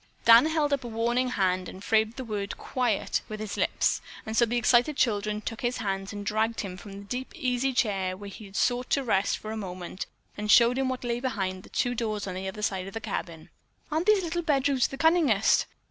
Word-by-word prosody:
Dan 230 Hz, +5 st, +8 dB
held 310 Hz, -2 st, +1 dB
up 275 Hz, -, 0 dB
a -, -, -5 dB
warning 240 Hz, +3 st, 0 dB
hand 185 Hz, -5 st, 0 dB
and 190 Hz, -, -10 dB
framed 220 Hz, +1 st, +2 dB
the 260 Hz, -, -5 dB
word 205 Hz, -4 st, -4 dB
"quiet" 245 Hz, -5 st, -1 dB
with 215 Hz, 0 st, -5 dB
his 215 Hz, -1 st, -4 dB
lips, -, -, +1 dB, 0.2 s
and 220 Hz, -, -4 dB
so 235 Hz, +1 st, +4 dB
the 240 Hz, +2 st, 0 dB
excited 245 Hz, +4 st, +3 dB
children 210 Hz, -2 st, +1 dB
took 225 Hz, +1 st, -5 dB
his 245 Hz, 0 st, 0 dB
hands 195 Hz, -3 st, -3 dB
and 205 Hz, 0 st, -6 dB
dragged 220 Hz, +2 st, 0 dB
him 190 Hz, -3 st, -6 dB
from 200 Hz, +1 st, -10 dB
the 200 Hz, -, -8 dB
deep 250 Hz, +6 st, -5 dB
easy 255 Hz, +1 st, 0 dB
chair 195 Hz, -7 st, 0 dB
where 200 Hz, +1 st, -9 dB
he 215 Hz, -, -10 dB
had 195 Hz, 0 st, -13 dB
sought 245 Hz, +3 st, +1 dB
to 275 Hz, -, +2 dB
rest 200 Hz, -5 st, +1 dB
for 215 Hz, -, -7 dB
a -, -, -4 dB
moment 185 Hz, -2 st, -6 dB, 0.3 s
and 210 Hz, +1 st, -4 dB
showed 235 Hz, +4 st, +6 dB
him 265 Hz, -1 st, +1 dB
what 255 Hz, -1 st, -4 dB
lay 240 Hz, 0 st, -1 dB
behind 195 Hz, -7 st, -2 dB
the -, -, -16 dB
two 245 Hz, -1 st, 0 dB
doors 215 Hz, -3 st, -2 dB
on 185 Hz, -, -4 dB
the 190 Hz, +1 st, -4 dB
other 210 Hz, +2 st, -6 dB
side 190 Hz, -2 st, -1 dB
of 195 Hz, -, -9 dB
the -, -, -2 dB
cabin. 165 Hz, -7 st, -5 dB, 0.4 s
"Aren't 320 Hz, +5 st, 0 dB
these 420 Hz, -3 st, +5 dB
little 345 Hz, +1 st, -2 dB
bedrooms 275 Hz, -5 st, +2 dB
the 270 Hz, -, -8 dB
cunningest?" 310 Hz, -, +3 dB
225 Hz, 230 wpm, -27 LUFS, 200-255 Hz, 0.4 s, Dan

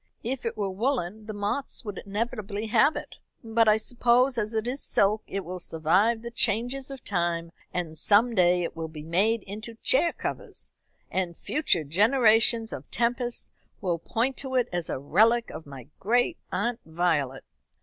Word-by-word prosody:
If 245 Hz, +1 st, -3 dB
it 230 Hz, -1 st, -4 dB
were 200 Hz, -2 st, -1 dB
woolen, 215 Hz, -2 st, -2 dB
the 215 Hz, -, -4 dB
moths 210 Hz, +6 st, -3 dB
would 205 Hz, -3 st, -5 dB
inevitably 210 Hz, 0 st, -3 dB
have 280 Hz, +7 st, +5 dB
it; -, -, -7 dB, 0.3 s
but, 225 Hz, 0 st, +2 dB
I 215 Hz, 0 st, +6 dB
suppose, 245 Hz, +3 st, +2 dB
as 215 Hz, -2 st, -1 dB
it 220 Hz, -1 st, -1 dB
is 255 Hz, +3 st, -2 dB
silk 210 Hz, +2 st, +2 dB
it 195 Hz, -1 st, -4 dB
will 180 Hz, +2 st, -5 dB
survive 185 Hz, +8 st, +1 dB
the 235 Hz, -, -6 dB
changes 245 Hz, +4 st, 0 dB
of 270 Hz, -2 st, -9 dB
time; 170 Hz, -3 st, -1 dB, 0.2 s
and 170 Hz, -3 st, -3 dB
some 220 Hz, +8 st, +4 dB
day 180 Hz, -3 st, +4 dB
it 170 Hz, -, -4 dB
will 165 Hz, 0 st, -4 dB
be 155 Hz, -1 st, -9 dB
made 195 Hz, +7 st, +1 dB
into 215 Hz, +3 st, -8 dB
chair 335 Hz, +6 st, +4 dB
covers, -, -, -6 dB, 0.4 s
and 180 Hz, -3 st, -2 dB
future 285 Hz, -, 0 dB
generations 225 Hz, -, +4 dB
of -, -, -8 dB
Tempests 240 Hz, +1 st, -1 dB, 0.3 s
will 175 Hz, -3 st, -1 dB
point 240 Hz, +9 st, -1 dB
to 265 Hz, -1 st, -3 dB
it 250 Hz, -1 st, +2 dB
as 175 Hz, -2 st, -2 dB
a -, -, -2 dB
relic 220 Hz, -, +3 dB
of 155 Hz, -, -9 dB
my 135 Hz, -4 st, -10 dB
great 245 Hz, -, +1 dB
aunt 240 Hz, 0 st, -1 dB
Violet." 160 Hz, -5 st, 0 dB
215 Hz, 170 wpm, -27 LUFS, 175-240 Hz, 0.4 s, I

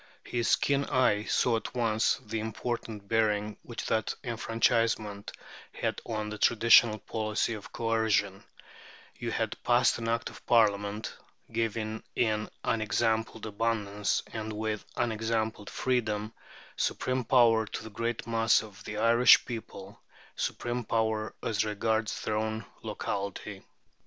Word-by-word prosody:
His 120 Hz, -1 st, +2 dB
keen 140 Hz, 0 st, +1 dB
eye 125 Hz, -6 st, +2 dB
saw 120 Hz, -2 st, +2 dB
at 110 Hz, -, -7 dB
once 115 Hz, -2 st, +2 dB
the 110 Hz, +1 st, -3 dB
important 110 Hz, -1 st, -4 dB
bearing 105 Hz, -1 st, +1 dB
which 120 Hz, -, -7 dB
that 110 Hz, -1 st, 0 dB
enfranchisement 115 Hz, -3 st, 0 dB, 0.4 s
had -, -, -2 dB
on 110 Hz, -1 st, -3 dB
the 105 Hz, 0 st, -6 dB
traditional 115 Hz, -1 st, +6 dB
policy 110 Hz, +1 st, -1 dB
of 105 Hz, -3 st, -8 dB
coercion: 110 Hz, -4 st, 0 dB, 0.8 s
"You -, -, -3 dB
had -, -, -2 dB
passed 120 Hz, 0 st, +3 dB
an 115 Hz, -, -4 dB
Act 115 Hz, 0 st, -1 dB
of -, -, -14 dB
Parliament, 105 Hz, -2 st, +2 dB, 0.4 s
giving 110 Hz, -1 st, -2 dB
in 110 Hz, -2 st, +1 dB
unexampled 110 Hz, 0 st, 0 dB
abundance, 105 Hz, -2 st, -1 dB
and 110 Hz, 0 st, -4 dB
with 110 Hz, 0 st, -3 dB
unexampled 110 Hz, -2 st, -1 dB
freedom, 110 Hz, -4 st, -1 dB, 0.4 s
supreme 130 Hz, 0 st, -1 dB
power 115 Hz, -3 st, +4 dB
to -, -, -6 dB
the 110 Hz, -, -9 dB
great 115 Hz, +2 st, -3 dB
mass 115 Hz, 0 st, +3 dB
of 105 Hz, -2 st, -13 dB
the 105 Hz, -, -5 dB
Irish 115 Hz, +3 st, +6 dB
people 110 Hz, -4 st, -8 dB, 0.3 s
supreme 120 Hz, 0 st, -2 dB
power 110 Hz, -1 st, -1 dB
as 105 Hz, -3 st, +1 dB
regards 110 Hz, +1 st, -1 dB
their 105 Hz, -, -1 dB
own 110 Hz, 0 st, -2 dB, 0.2 s
locality.... 100 Hz, 0 st, -4 dB
110 Hz, 125 wpm, -29 LUFS, 105-115 Hz, 0.8 s, traditional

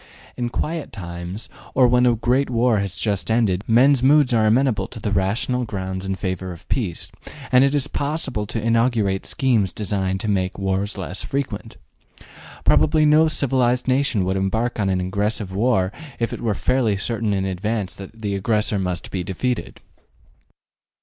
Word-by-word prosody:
In 120 Hz, -1 st, -2 dB
quiet 155 Hz, +5 st, -3 dB
times, 85 Hz, +2 st, -6 dB, 0.3 s
or 125 Hz, -1 st, +6 dB
when 125 Hz, +1 st, +4 dB
a 120 Hz, -, +4 dB
great 125 Hz, +4 st, +1 dB
war 120 Hz, -2 st, +2 dB
has 100 Hz, -1 st, -2 dB
just 105 Hz, -2 st, -1 dB
ended, 105 Hz, -5 st, +2 dB
men's 130 Hz, +3 st, +5 dB
moods 140 Hz, -1 st, +4 dB
are 110 Hz, -2 st, +3 dB
amenable 120 Hz, +1 st, +2 dB
to -, -, -10 dB
the 105 Hz, -, -3 dB
rational 100 Hz, +6 st, 0 dB
grounds 95 Hz, -4 st, -4 dB
in 95 Hz, 0 st, -2 dB
favor 95 Hz, -1 st, -3 dB
of 85 Hz, -, -12 dB
peace, 100 Hz, -10 st, -2 dB, 0.4 s
and 125 Hz, +1 st, +6 dB
it 140 Hz, +1 st, +2 dB
is 145 Hz, -1 st, +1 dB
possible 140 Hz, -9 st, -2 dB
to 115 Hz, -, -2 dB
inaugurate 115 Hz, -3 st, +1 dB
schemes 115 Hz, -8 st, +1 dB
designed 95 Hz, -3 st, -2 dB
to -, -, -3 dB
make 95 Hz, -3 st, 0 dB
wars 95 Hz, +1 st, -1 dB
less 95 Hz, -1 st, -4 dB
frequent. 140 Hz, -1 st, -4 dB, 0.9 s
Probably 155 Hz, 0 st, +4 dB
no 155 Hz, +2 st, +5 dB
civilized 130 Hz, -4 st, +1 dB
nation 130 Hz, -7 st, +2 dB
would 95 Hz, +1 st, 0 dB
embark 110 Hz, +6 st, -1 dB
upon 100 Hz, -2 st, +1 dB
an 95 Hz, -1 st, +1 dB
aggressive 100 Hz, +1 st, -2 dB
war 100 Hz, -3 st, +1 dB, 0.3 s
if 115 Hz, -2 st, -2 dB
it -, -, -6 dB
were 110 Hz, -3 st, 0 dB
fairly 120 Hz, -5 st, +1 dB
certain 110 Hz, +1 st, -1 dB
in 95 Hz, -1 st, 0 dB
advance 95 Hz, 0 st, -2 dB
that 110 Hz, +4 st, -11 dB
the 100 Hz, -1 st, -1 dB
aggressor 105 Hz, +1 st, 0 dB
must 90 Hz, -2 st, -3 dB
be 95 Hz, -2 st, -2 dB
defeated. 120 Hz, +7 st, -3 dB
110 Hz, 170 wpm, -22 LUFS, 95-125 Hz, 0.9 s, or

